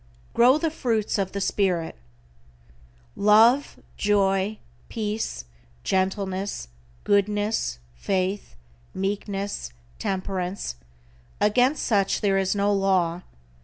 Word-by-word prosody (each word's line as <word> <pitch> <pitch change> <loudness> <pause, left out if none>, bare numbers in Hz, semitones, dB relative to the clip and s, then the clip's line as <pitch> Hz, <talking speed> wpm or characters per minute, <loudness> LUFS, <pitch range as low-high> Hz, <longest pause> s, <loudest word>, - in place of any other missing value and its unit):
=GROW 250 +4 +6
THE 320 0 -1
FRUITS 225 -9 -1
OF 190 -1 -1
THE 200 - -3
SPIRIT:= 185 -4 0 1.2
Love, 225 +7 +4 0.2
Joy, 200 0 +1 0.3
Peace, 215 - -3 0.4
Gentleness, 190 - -1 0.3
Goodness, 205 - +1 0.2
Faith, 190 - -2 0.4
Meekness, 195 - -3 0.3
Temperance, 185 - -3 0.7
against 250 +7 +3
such 200 -4 +1
there 195 -2 +2
is 190 +1 0
no 205 0 +2
law. 185 -3 +1
200 Hz, 90 wpm, -25 LUFS, 190-210 Hz, 1.2 s, =GROW